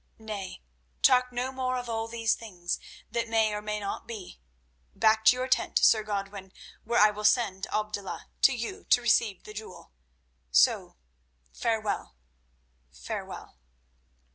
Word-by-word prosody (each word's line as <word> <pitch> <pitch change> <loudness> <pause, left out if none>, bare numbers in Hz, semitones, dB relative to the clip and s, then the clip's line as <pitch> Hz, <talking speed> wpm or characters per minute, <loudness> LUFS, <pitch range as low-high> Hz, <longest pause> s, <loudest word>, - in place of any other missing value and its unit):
Nay, 205 - -7 0.4
talk 250 0 +5
no 250 +2 -2
more 255 -1 -1
of 245 -1 -5
all 225 -1 -2
these 230 -1 +1
things 180 -6 -4 0.3
that 230 -1 -1
may 220 -1 +2
or 210 - -3
may 210 0 -3
not 200 -1 -5
be. 210 - -8 0.6
Back 220 0 +3
to 250 - +8
your 255 +1 -2
tent, 255 - +1
Sir 220 - +5
Godwin, 200 -2 -5 0.3
where 235 +2 +1
I 210 0 +7
will 210 0 -7
send 210 -4 +2
Abdullah 210 -2 -3
to - - +7
you 260 - -5
to - - +5
receive 220 -4 +2
the 210 - -10
jewel. 210 - -10 0.6
So, - - +3 0.6
farewell, 215 - -2 0.8
farewell." 65 - -7
220 Hz, 140 wpm, -28 LUFS, 205-235 Hz, 0.8 s, to